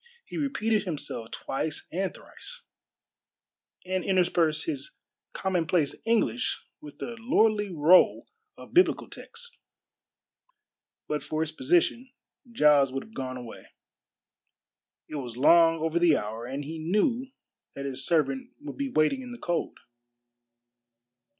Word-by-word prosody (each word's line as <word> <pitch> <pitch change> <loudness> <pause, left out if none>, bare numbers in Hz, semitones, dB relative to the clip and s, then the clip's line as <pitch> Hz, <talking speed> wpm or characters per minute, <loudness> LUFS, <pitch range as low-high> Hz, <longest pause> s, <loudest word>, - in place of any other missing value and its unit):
He - - -10
repeated 225 -8 0
himself 140 -9 -4
twice 150 +2 -4
and 190 +2 -1
thrice, - - -13 1.2
and 185 0 -1
interspersed 175 -4 +2
his 325 - -5 0.4
common 180 -4 -1
place 165 -5 +1
English 230 +2 0 0.2
with 150 -1 -11
the 235 - -6
lordly 220 -4 +2
roll 170 +1 +5 0.3
of - - -13
biblical 360 +2 +4
texts. 480 0 -11 1.5
But 150 0 -2
for 155 0 -2
his 160 -1 -1
position, 175 - +1 0.4
Giles 150 - +4
would 135 +1 -4
have 220 - -18
gone 130 -5 -5
away. 120 -2 -11 1.3
It 155 - -6
was 120 -4 -6
long 165 +4 +6
over 160 +1 0
the 170 -3 +5
hour, 110 +3 -5
and 140 +3 -5
he 160 +2 -6
knew 215 - +1 0.5
that 140 - -5
his 135 -1 -2
servant 135 -4 0
would 295 0 -8
be 280 -1 -2
waiting 245 - +2
in 250 -1 -9
the 240 - -8
cold. 175 -6 -2
170 Hz, 130 wpm, -27 LUFS, 145-225 Hz, 1.5 s, long